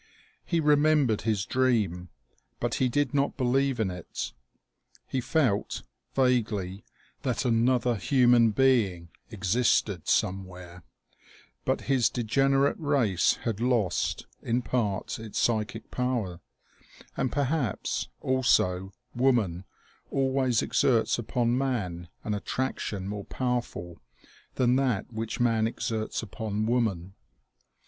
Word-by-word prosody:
He 170 - 0
remembered 150 -6 +3
his 110 -3 0
dream, 105 -9 0 0.5
but - - -1
he 130 - +3
did 145 +1 0
not 140 -1 +1
believe 135 0 +1
in 100 -4 0
it. 90 -2 -6 0.7
He 130 - -2
felt, 125 -5 0 0.3
vaguely, 105 -7 +1 0.4
that 130 -1 -1
another 125 +1 +2
human 120 +2 +4
being 105 -8 +2 0.2
existed 100 -3 +1
somewhere; 90 -2 -1 0.8
but - - 0
his 130 -3 +2
degenerate 135 +4 +2
race 135 - +2
had 110 -3 -2
lost, 120 -8 0 0.2
in 120 +2 0
part, 110 -6 -1
its 110 -2 -7
psychic 110 -1 -1
power, 120 -9 -2 0.8
and 130 - -1
perhaps, 140 -5 -1
also, 95 -8 +2 0.2
woman 115 -9 +1 0.4
always 130 -3 +1
ex - - -1
erts 120 -2 +2
upon 120 +1 0
man 100 -11 -2
an 105 - -2
attraction 105 -3 -3
more 100 0 -5
powerful 120 -9 -3 0.5
than 125 0 +3
that 125 -4 -1
which 115 +3 -4
man 115 -2 +2
exerts 110 -1 -3
upon 110 0 -3
woman. 110 -7 0
115 Hz, 110 wpm, -28 LUFS, 100-130 Hz, 0.8 s, human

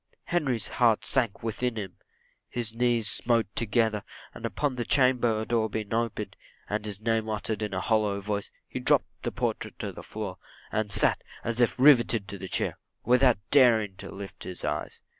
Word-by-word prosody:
Henry's 135 -10 0
heart 115 -4 +2
sunk 120 -5 0
within 115 +2 -1
him 95 -5 -6 0.5
his 115 -2 -3
knees 120 -2 +1
smote 115 -1 0
together, 110 -2 +1 0.3
and 115 - -4
upon 130 +7 -1
the 120 - -1
chamber 120 -4 +3
door 115 -2 +1
being 105 0 -4
opened, 110 -3 -2 0.3
and 105 +1 -2
his 100 -1 -4
name 110 -1 0
uttered 110 0 -2
in 105 -1 -2
a - - -2
hollow 105 -3 +1
voice, 100 0 -3 0.2
he - - -5
dropped - - +1
the - - -2
portrait - - -3
to - - -4
the - - -9
floor; 100 -4 -6 0.3
and 110 -1 -1
sat, - - +2 0.2
as 115 0 -2
if 120 - +2
rivitted 120 -6 +5
to 100 0 -6
the 95 - -6
chair, - - -1 0.3
without 125 -1 +5
daring 115 -8 +5
to - - -8
lift 100 0 -9
up - - -8
his 90 - -6
eyes. 75 0 -3
110 Hz, 180 wpm, -28 LUFS, 105-120 Hz, 0.5 s, rivitted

